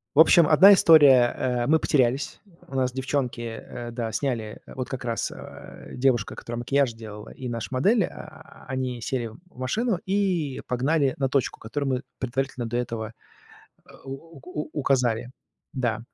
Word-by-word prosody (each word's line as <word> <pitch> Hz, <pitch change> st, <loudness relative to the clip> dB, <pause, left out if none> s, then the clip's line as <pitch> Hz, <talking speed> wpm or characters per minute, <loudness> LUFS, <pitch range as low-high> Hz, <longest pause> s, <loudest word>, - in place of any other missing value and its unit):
В -, -, +3 dB
общем, 165 Hz, 0 st, +6 dB
1 195 Hz, +6 st, +8 dB
история, 145 Hz, -9 st, +6 dB
э, 125 Hz, -1 st, -1 dB
мы 160 Hz, -, +5 dB
потерялись. 135 Hz, -2 st, +1 dB, 0.3 s
У 135 Hz, -, -8 dB
нас 130 Hz, -1 st, 0 dB
девчонки, 130 Hz, -2 st, -2 dB
э, 120 Hz, +1 st, -7 dB
да, 115 Hz, -2 st, -4 dB
сняли 115 Hz, -6 st, -3 dB
вот 130 Hz, -1 st, -6 dB
как 130 Hz, -, -6 dB
раз, 115 Hz, -1 st, -2 dB
а, -, -, -11 dB
девушка, 125 Hz, -4 st, 0 dB
которая 120 Hz, 0 st, -6 dB
макияж 135 Hz, 0 st, +1 dB
делала, 105 Hz, -2 st, -10 dB
и 130 Hz, -2 st, -6 dB
наша 115 Hz, -2 st, -4 dB
модель, 195 Hz, -, +3 dB
а, -, -, -12 dB
они 130 Hz, -2 st, -3 dB
сели 120 Hz, 0 st, -2 dB
в 110 Hz, -, -13 dB, 0.2 s
машину 215 Hz, -, 0 dB
и 185 Hz, -8 st, 0 dB
погнали 135 Hz, +2 st, +1 dB
на 135 Hz, -, +1 dB
точку, 135 Hz, -2 st, -1 dB
которую 140 Hz, +5 st, -3 dB
мы 125 Hz, -, -3 dB, 0.2 s
предварительно 130 Hz, 0 st, -3 dB
до 120 Hz, +1 st, -2 dB
этого 115 Hz, -2 st, -4 dB, 0.9 s
у 140 Hz, +4 st, -9 dB
у 150 Hz, -4 st, -5 dB
указали. 125 Hz, -4 st, 0 dB, 0.4 s
Да, 120 Hz, -5 st, -1 dB
130 Hz, 155 wpm, -25 LUFS, 120-140 Hz, 0.9 s, 1